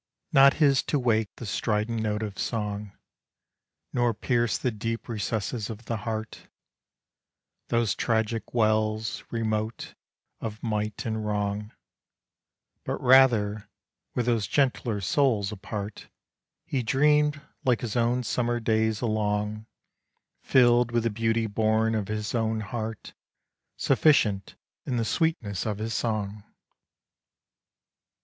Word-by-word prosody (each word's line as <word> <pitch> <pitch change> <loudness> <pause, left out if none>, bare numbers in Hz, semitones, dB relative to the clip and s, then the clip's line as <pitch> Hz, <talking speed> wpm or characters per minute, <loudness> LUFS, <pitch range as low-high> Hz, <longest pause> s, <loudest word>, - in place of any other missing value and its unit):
Not 135 0 +7
his 140 -4 +4
to 150 - +1
wake 110 -5 +1
the 120 - -8
strident 110 +2 -1
note 105 0 -1
of 105 -2 -6
song, 105 -2 -3 1.0
Nor 120 -2 +2
pierce 120 0 +1
the 125 - -1
deep 115 +1 -4
recesses 110 +1 -2
of 110 +1 -8
the 115 - -2
heart, 110 0 -5 1.2
Those 115 -3 +1
tragic 110 -1 -1
wells, 110 -1 +1
remote, 110 -1 -2 0.5
of 110 -1 -6
might 105 -2 -2
and 110 -1 -2
wrong; 105 0 -2 1.1
But - - -3
rather, 120 -5 +4 0.5
with 120 - 0
those 115 -4 +1
gentler 125 -6 +1
souls 110 -1 +2
apart, 105 0 -6 0.6
He 135 - -1
dreamed 150 +5 +3 0.2
like 125 -3 +2
his 115 -2 -4
own 120 +1 +2
summer 120 0 0
days 110 -1 +1
along, 105 -1 -1 0.7
Filled 120 -2 +4
with 120 -1 +1
the 115 - 0
beauty 115 +1 0
born 110 +1 +1
of 105 -3 -1
his 105 -1 -3
own 110 -2 0
heart, 110 +1 -5 0.6
Sufficient 105 -10 +2 0.3
in 125 -3 -2
the 115 - 0
sweetness 115 - -1
of 105 -2 -2
his 110 +1 -3
song. 105 -3 -2
110 Hz, 120 wpm, -27 LUFS, 105-120 Hz, 1.2 s, Not